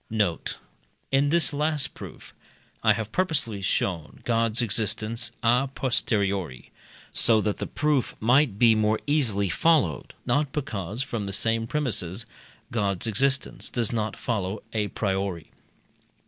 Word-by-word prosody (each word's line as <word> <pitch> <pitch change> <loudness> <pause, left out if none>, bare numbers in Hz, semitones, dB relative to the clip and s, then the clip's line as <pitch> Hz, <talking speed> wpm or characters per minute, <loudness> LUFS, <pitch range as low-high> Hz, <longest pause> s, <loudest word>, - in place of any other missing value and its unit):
Note. 105 -6 -1 0.5
In 135 +1 +3
this 155 -3 +3
last 150 0 0
proof, - - -11 0.5
I 110 -1 +5
have 110 +1 -4
purposely 145 - 0
shown 90 -4 -1
God's 115 -1 +2
existence 110 +1 -1
à 125 +3 +3
posteriori, 100 - -1 0.4
so 115 -2 +5
that 105 -1 -1
the - - -4
proof 150 -4 0
might 125 -1 +3
be 115 0 +6
more 110 0 +2
easily 120 -10 +2
followed, 130 - +2
not 145 -1 +1
because, 110 - -3
from 115 -6 -4
the 100 - -4
same 115 +2 0
premises, 115 - -1 0.5
God's 100 -5 0
existence 135 +5 0
does 120 -3 0
not 110 -1 -2
follow 100 -3 -2
à 105 -2 -1
priori. 95 -5 -2
115 Hz, 130 wpm, -26 LUFS, 100-135 Hz, 0.5 s, be